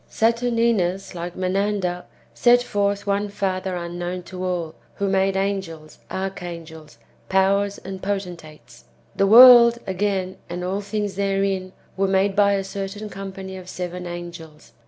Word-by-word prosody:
Saturninus, 230 -5 +1
like 175 0 -6
Menander, 185 -1 -1 0.3
set 245 0 +4
forth 200 -2 -1
one 200 +1 0
father 190 -2 -2
unknown 175 +1 -5
to 180 +1 -7
all, 175 -3 -2 0.2
who 200 - -1
made 195 0 +1
angels, 190 -6 -4
archangels, 170 -5 -7 0.3
powers, 200 +1 +2
and 190 0 -8
potentates. 170 -11 -6 0.3
The 195 - +2
world, 235 +1 +9
again, 190 -1 -2
and 175 +1 -5
all 190 +3 -2
things 205 -1 -3
therein, 195 -1 0 0.3
were 195 0 +2
made 195 +1 +1
by 200 -1 +4
a 195 -1 0
certain 200 +2 -6
company 190 -1 -7
of 185 -1 -10
seven 180 0 -5
angels. 170 -3 -9
190 Hz, 135 wpm, -22 LUFS, 180-200 Hz, 0.3 s, world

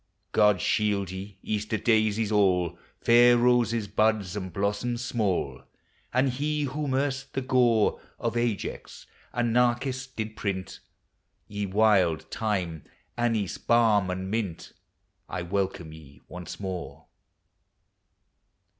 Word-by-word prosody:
God 105 -3 +4
shield 100 -3 +1
ye, 95 +1 -8
Easter 105 +1 -2
daisies 110 -1 +2
all. 90 -4 +2 0.2
Fair 120 +1 +6
roses, 120 -3 +2
buds, 105 -2 +1
and 95 -3 -4
blossoms 105 +6 -2
small, 95 - -1 0.5
And 130 +2 +2
he 150 +3 -1
whom 140 0 -2
erst 135 0 -2
the 135 - 0
gore 125 -4 +2 0.2
Of 115 0 -2
Ajax 120 -4 -3 0.3
and 120 -1 0
Narciss 125 +2 +1
did 110 -4 -6
print, 95 -4 -4 0.7
Ye 105 -1 -3
wild 95 -5 +3
thyme, 90 -8 -2 0.3
anise, 115 -5 -1
balm, 110 -5 +3
and 95 +1 -3
mint, 105 -7 -3 0.6
I - - -3
welcome 95 -3 -2
ye 75 -3 -14
once 90 -1 -8
more 95 -3 -6
105 Hz, 115 wpm, -27 LUFS, 95-120 Hz, 0.7 s, Fair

